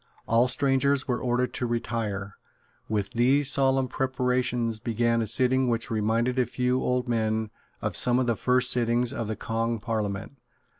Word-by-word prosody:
All 115 +2 +3
strangers 135 +1 +1
were 125 -2 -1
ordered 125 0 -1
to 125 - -2
retire. 110 -4 -3 0.5
With 105 -2 -2
these 130 +4 +3
solemn 135 -1 +3
preparations 125 -3 -1
began 115 0 0
a 110 - -2
sitting 130 +3 +2
which 115 -1 -1
reminded 115 +4 0
a 125 - +1
few 125 +1 -1
old 125 0 -1
men 110 -2 -1 0.3
of - - -2
some 125 0 +3
of 130 - +1
the 120 -1 0
first 125 +3 +2
sittings 120 +1 +1
of 115 -5 -4
the 110 - -3
Kong 115 +1 -2
Parliament. 110 +2 -4
120 Hz, 160 wpm, -26 LUFS, 115-125 Hz, 0.5 s, All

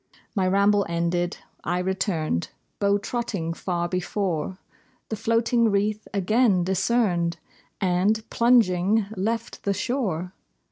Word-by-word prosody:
My 190 -3 +1
ramble 200 +2 +4
ended, 170 +1 0 0.3
I 175 +2 0
returned; 180 - -1 0.3
Beau 200 0 +3
trotting 205 -6 -3
far 175 0 -2
before 180 -1 -2 0.5
The 220 - -2
floating 230 +1 +2
wreath 210 +1 0
again 200 -1 +3
discerned, 185 -3 +1 0.4
And, 195 +4 +1
plunging, 220 -4 +3
left 225 +4 -2
the 200 -1 0
shore. 190 - -2
195 Hz, 105 wpm, -25 LUFS, 175-220 Hz, 0.5 s, ramble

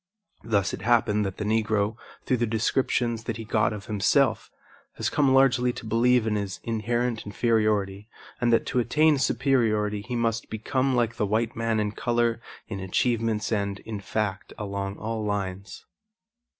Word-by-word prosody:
Thus 105 -3 0
it - - -5
happened 110 -3 +2
that 95 - -6
the - - -3
Negro, 110 -1 +1 0.3
through 125 - +1
the 120 0 0
descriptions 115 0 0
that - - -3
he 115 - -6
got 105 -1 +1
of 105 -2 -7
himself, 105 -3 +1 0.4
has - - -2
come 140 -3 +3
largely 130 -2 +4
to - - -9
believe 120 +1 +3
in 110 - 0
his 100 -1 -4
inherent 115 +1 -1
inferiority 105 -2 0 0.3
and 120 -2 +2
that 115 - +3
to 125 - 0
attain 150 +5 +3
superiority 115 -6 +1
he 120 +4 -5
must 115 -1 -1
become 130 +4 0
like 115 -1 0
the 105 - 0
white 110 +3 0
man 115 -1 0
in 105 -1 0
color, 120 0 0 0.3
in 100 -3 -5
achievements 110 +3 0
and, 100 -2 -1
in 110 -2 -6
fact, 100 0 -3
along 100 -1 -4
all 110 0 -3
lines. 100 -2 -4
110 Hz, 165 wpm, -26 LUFS, 105-120 Hz, 0.4 s, largely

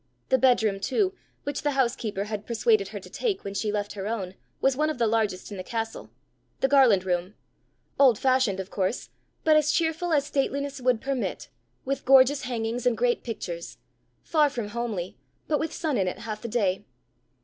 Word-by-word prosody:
The 260 - +4
bedroom 220 -6 +3
too, 370 - +1 0.3
which 285 -1 -3
the 290 -1 0
housekeeper 235 -6 0
had 210 0 -5
persuaded 405 - +2
her - - -6
to - - -13
take 445 -6 -2
when 200 - -5
she 210 +1 -1
left 205 -1 -2
her 200 -1 -5
own, 200 -5 -3 0.3
was 270 -1 +2
one 305 +3 +1
of 310 - -3
the 235 - +2
largest 215 -4 0
in 200 - -6
the 185 - -5
castle 225 +2 -4 0.5
the 270 - +3
Garland 255 -9 +5
room 180 +2 -1 0.6
old 260 -6 +6
fashioned, 255 -7 +2
of 190 0 -6
course, 190 +4 -2 0.3
but 310 -1 +5
as 305 0 +4
cheerful 330 +1 0
as 290 -3 +3
stateliness 280 0 -2
would 250 -2 +2
permit, 270 -2 -3 0.4
with 275 +1 -2
gorgeous 270 +1 +5
hangings 235 0 -2
and 235 -2 +2
great 240 0 +1
pictures 175 -7 -6 0.5
far 305 -3 +3
from 235 -6 -4
homely, 215 -6 -4 0.3
but 300 - +1
with 320 0 -2
sun 305 -9 -1
in 190 - +1
it 180 - -3
half 215 -2 -6
the 235 - -5
day. 205 -4 0
240 Hz, 190 wpm, -26 LUFS, 205-275 Hz, 0.6 s, old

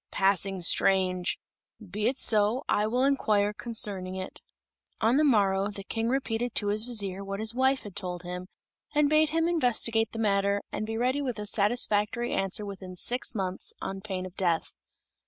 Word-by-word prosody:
"Passing 195 -1 +1
strange! 185 0 +3 0.4
Be 210 0 -3
it 260 +2 0
so. 215 +4 +2
I 210 +1 +2
will 250 +4 +1
inquire 215 -7 +2
concerning 200 -5 -2
it." 190 0 -7 0.6
On 230 +4 +3
the 305 - +4
morrow 200 -7 +3
the 200 -1 -7
King 225 +3 -2
repeated 245 -2 -1
to 205 - +2
his 215 +2 +1
vizier 200 -5 -1
what 195 0 -5
his 220 +1 +2
wife 265 +2 +2
had 205 -3 -10
told 180 -3 -4
him, 180 +1 -6 0.5
and 295 0 +3
bade 310 0 +4
him 325 +1 +1
investigate 235 -8 +1
the - - -7
matter, 200 -2 +1
and 215 - -3
be 225 0 -3
ready 255 +4 +1
with 250 -5 -3
a 210 - -5
satisfactory 210 +2 +1
answer 195 +2 0
within 190 -2 -8
six 245 +7 -1
months, 190 -2 -1
on 195 0 -5
pain 190 -2 -4
of 185 - -9
death. 170 -4 0
210 Hz, 175 wpm, -28 LUFS, 195-240 Hz, 0.6 s, the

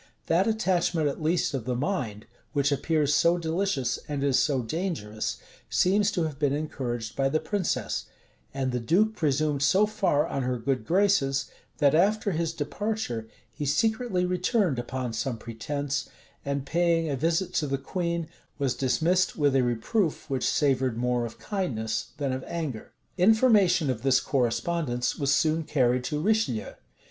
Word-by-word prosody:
That 180 +5 +2
attachment 175 -7 +1
at 140 - -3
least 165 +1 +1
of 130 -5 -3
the 125 -1 -1
mind, 120 - -2 0.3
which 145 -1 +2
appears 150 +1 +1
so 170 +4 +4
delicious, 160 -6 -1
and 145 -2 -2
is 140 -2 +3
so 135 -5 +1
dangerous, 115 - -3 0.3
seems 200 +3 +3
to 175 - 0
have 150 -3 -4
been 145 -2 +2
encouraged 125 -6 -3
by 135 0 +1
the 155 +3 +1
princess; 200 -1 -2 0.5
and 130 -1 -2
the 125 - -1
duke 195 - +2
presumed 150 -3 0
so 185 +9 +4
far 190 -9 +1
on 140 - -3
her 125 0 -1
good 130 +2 -2
graces, 170 -8 +2 0.3
that, 140 -1 +4
after 205 +5 +3
his 165 -1 -1
departure, 165 - -3 0.3
he 150 - -5
secretly 215 - +1
returned 180 - +1
upon 125 -1 -4
some 115 +2 -2
pretence, 140 +6 -4 0.3
and, 140 -1 -2
paying 165 +1 +1
a 145 - -1
visit 165 +6 0
to 150 - 0
the 135 0 -1
queen, 170 +3 -2 0.3
was 140 -3 0
dismissed 170 +8 +1
with 145 -3 +2
a 135 - +5
reproof 135 - 0
which 130 -2 +1
savored 130 -5 +1
more 125 0 0
of 115 - -12
kindness 115 - -3
than 140 -3 -1
of 130 0 -4
anger.[*] 155 -10 -4 0.3
Information 195 - +4
of 115 -3 -5
this 135 0 +4
correspondence 125 0 -1
was 140 -1 +1
soon 155 +2 +2
carried 125 -5 +1
to 150 - -2
Richelieu. 210 - 0
150 Hz, 160 wpm, -27 LUFS, 130-175 Hz, 0.5 s, a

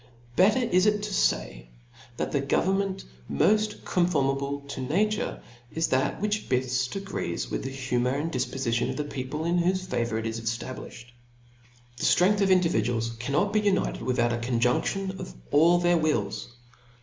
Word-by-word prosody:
Better 200 +6 +5
is 185 -4 +3
it 210 -1 +2
to 210 -1 -4
fay, - - 0 0.5
that - - -2
the 140 - +1
government 190 +7 0 0.3
moft 215 0 +1
conformable 140 -5 0
to 140 -1 -7
nature, 205 +11 -1 0.3
is 160 0 +1
that 130 +1 +1
which 210 +1 -1
beft 125 +1 0
agrees 195 - -4
With - - -2
the 135 - -3
humour 130 -1 -1
and 155 +4 -2
difpofition 125 -2 -1
of - - -3
jhe 145 - -9
people, 140 +4 -4
in 175 +1 +2
whofe 185 +2 +1
favour 115 -8 -1
it 110 - -3
is 115 0 -3
eftablifhed. 120 +1 -5 0.9
The - - -6
ftrcngth 200 +4 +4
of 195 - +3
individuals 120 - +2
cannot 145 - 0
be 215 - +3
united 200 -2 0
without 120 -1 +1
a - - 0
conjunftion 125 +11 0
of 60 - -7 0.2
all 165 +4 +5
their 175 0 +3
wills. 110 -10 -1
140 Hz, 160 wpm, -27 LUFS, 125-190 Hz, 0.9 s, Better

